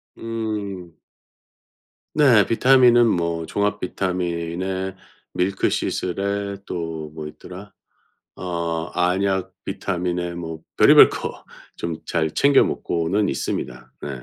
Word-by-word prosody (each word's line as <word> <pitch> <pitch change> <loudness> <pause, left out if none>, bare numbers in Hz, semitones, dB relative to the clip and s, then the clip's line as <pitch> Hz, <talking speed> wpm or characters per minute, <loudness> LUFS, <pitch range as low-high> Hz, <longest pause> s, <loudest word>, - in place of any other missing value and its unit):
음. 105 -7 -5 1.2
네 130 -9 +5
비타민은 120 0 +5
뭐 85 -4 0
종합 105 +3 -1
비타민에 90 +1 -3 0.4
밀크시슬에 100 +1 -1
또 80 -3 -5
뭐 80 -1 -6
있더라? 90 +6 -11 0.6
어 85 -2 -3
안약 95 +1 0
비타민에 90 -2 -2
뭐 80 -2 -6 0.2
별의별 - - +8
거 - - -6 0.3
좀 85 -1 -4
잘 80 -2 0
챙겨 140 -1 +5
먹고는 90 +5 -1
있습니다. 60 -2 -4
네. - - -4
90 Hz, 200 characters per minute, -22 LUFS, 85-100 Hz, 1.2 s, 별의별